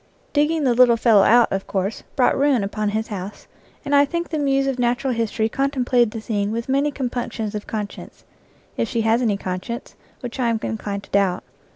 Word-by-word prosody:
Digging 300 +1 +2
the 255 -3 +3
little 240 -1 +5
fellow 225 -3 +5
out, 235 +4 +5
of 195 0 -2
course, 195 +2 -2
brought 260 -3 +3
ruin 275 -5 +2
upon 210 +1 -2
his 220 +2 -2
house, 200 -1 -7 0.4
and 285 - -2
I 285 0 +7
think 340 +4 -3
the 315 - -2
Muse 275 -1 +1
of 270 -2 -2
Natural 245 +2 +1
History 225 -1 0
contemplated 250 -2 +1
the 225 0 -7
scene 205 -2 -1
with 230 +1 -3
many 275 +2 +2
com 265 -4 -3
punctions 225 -3 -4
of 210 -1 -5
conscience, 210 -2 -6 0.5
if 230 - -1
she 230 - 0
has 225 +2 +2
any 215 -5 +1
conscience, 190 +6 -5 0.3
which 245 0 -7
I 240 -2 +2
am 225 -1 0
inclined 205 -2 -4
to - - -17
doubt. 195 -2 +1
235 Hz, 205 wpm, -22 LUFS, 210-270 Hz, 0.5 s, I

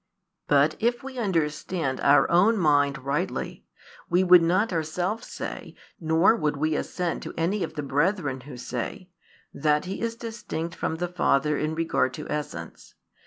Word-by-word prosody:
But, 145 +2 +4
if 240 +3 0
we 265 -2 -7
understand 165 - -1
our 140 +1 +5
own 200 +7 +5
mind 145 -5 +3
rightly, 150 +7 -3 0.4
we 180 +2 +3
would 180 -1 +8
not 185 +5 +2
ourselves 175 +7 -2
say, - - -7 0.2
nor 165 +6 +4
would 150 -6 -1
we 155 +2 0
assent 175 +2 -2
to - - -8
any 185 +5 0
of 160 - -5
the 150 - -3
brethren 145 -1 0
who 130 -1 -10
say, 125 +9 -5 0.4
that 150 +1 +1
He 190 +2 -5
is 230 0 -2
distinct 220 -8 -5
from 160 - -2
the 175 +2 -2
Father 150 -4 +1
in 155 +2 -2
regard 160 -5 0
to 150 - -7
essence. 150 0 -6
165 Hz, 160 wpm, -26 LUFS, 150-185 Hz, 0.4 s, would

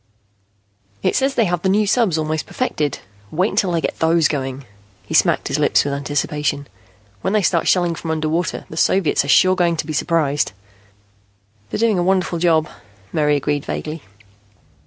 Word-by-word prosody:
"It - - +1
says 270 0 +1
they 230 - +3
have 175 -2 -1
the 190 - +1
new 210 +2 +3
subs 205 -5 +2
almost 155 0 -2
perfected. 150 - -2 0.3
Wait 185 +6 0
until 195 -2 +1
they 170 -1 0
get - - -3
those 160 -1 +3
going." 135 -2 -4 0.4
He - - -7
smacked - - +3
his - - -1
lips - - +3
with 140 - -2
anticipation. 145 0 -2 0.6
"When 190 - -1
they 210 -2 +2
start 170 -2 +1
shelling 175 -2 +2
from 165 0 -7
underwater, 160 +2 -1
the 160 - -8
Soviets 185 -3 +2
are - - -6
sure 185 +4 +5
going 170 -2 +1
to 155 - -2
be 155 - -5
surprised." 150 -4 0 1.2
"They're - - -3
doing 220 -4 +2
a - - +1
wonderful 185 -2 +1
job," 160 -2 +2 0.5
Mary 150 -1 +2
agreed 145 0 -1
vaguely. 155 +1 -5
165 Hz, 175 wpm, -19 LUFS, 150-185 Hz, 1.2 s, sure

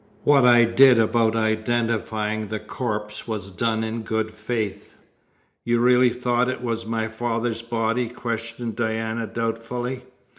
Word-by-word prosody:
What 140 -3 +5
I 120 -1 +7
did 125 +2 +6
about 115 0 +2
identifying 110 -1 -1
the 110 +1 -3
corpse 105 -4 -4
was 105 -4 -4
done 110 +4 -1
in 110 +1 -3
good 110 0 -2
faith." 110 -1 -4 0.7
"You 120 0 +1
really 125 +1 +5
thought 125 0 0
it 130 -1 -4
was 115 -2 -3
my 110 -1 -1
father's 115 0 -2
body?" 115 +1 -1
questioned 115 -1 -4
Diana 110 0 -2
doubtfully. 115 +3 -3
115 Hz, 135 wpm, -23 LUFS, 110-120 Hz, 0.7 s, I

